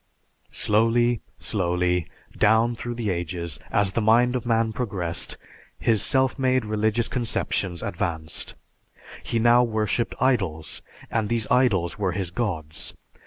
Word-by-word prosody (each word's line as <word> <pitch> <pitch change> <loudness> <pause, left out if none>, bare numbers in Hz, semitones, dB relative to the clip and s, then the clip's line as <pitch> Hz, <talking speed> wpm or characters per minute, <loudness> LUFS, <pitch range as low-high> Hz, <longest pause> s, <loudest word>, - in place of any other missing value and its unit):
Slowly, 115 +2 +2 0.2
slowly, 90 -3 0 0.3
down 110 +3 +3
through 120 +1 -5
the 115 -4 -1
ages, 85 -2 -4
as 100 -2 +2
the 115 - 0
mind 120 +3 +4
of 125 -1 -3
man 115 -1 +2
progressed, 100 -8 -3 0.4
his 110 -4 +2
self 130 0 +2
made 130 -2 +2
religious 110 +2 0
conceptions 100 -7 -2
advanced. 80 -2 -4 0.7
He 115 - -2
now 120 +2 +5
worshiped 110 0 0
idols, 95 - 0 0.3
and 110 -2 0
these 115 -2 +1
idols 105 -8 +2
were 95 -3 0
his 90 -2 -3
gods. 85 -7 -4
110 Hz, 125 wpm, -25 LUFS, 90-120 Hz, 0.7 s, now